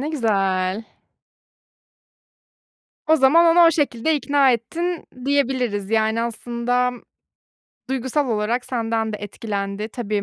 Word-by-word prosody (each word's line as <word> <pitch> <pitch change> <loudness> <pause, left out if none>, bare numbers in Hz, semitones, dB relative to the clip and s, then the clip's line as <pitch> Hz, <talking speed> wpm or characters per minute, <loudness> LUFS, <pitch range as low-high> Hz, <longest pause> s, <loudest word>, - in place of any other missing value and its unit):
Ne 290 - -3
güzel. 195 -6 0 2.2
O 315 +1 +5
zaman 315 +5 +5
onu 335 +1 +6
o - - +6
şekilde 295 -1 0
ikna 280 -2 +3
ettin, 335 +9 -3 0.2
diyebiliriz. 255 -7 0
Yani, 220 +1 +1
aslında 240 +2 -1 1.0
duygusal 265 +2 -1
olarak 225 +3 -1
senden 225 -2 -2
de - - -3
etkilendi. 205 0 -4
Tabii, 215 -3 -3
235 Hz, 105 wpm, -21 LUFS, 215-280 Hz, 2.2 s, onu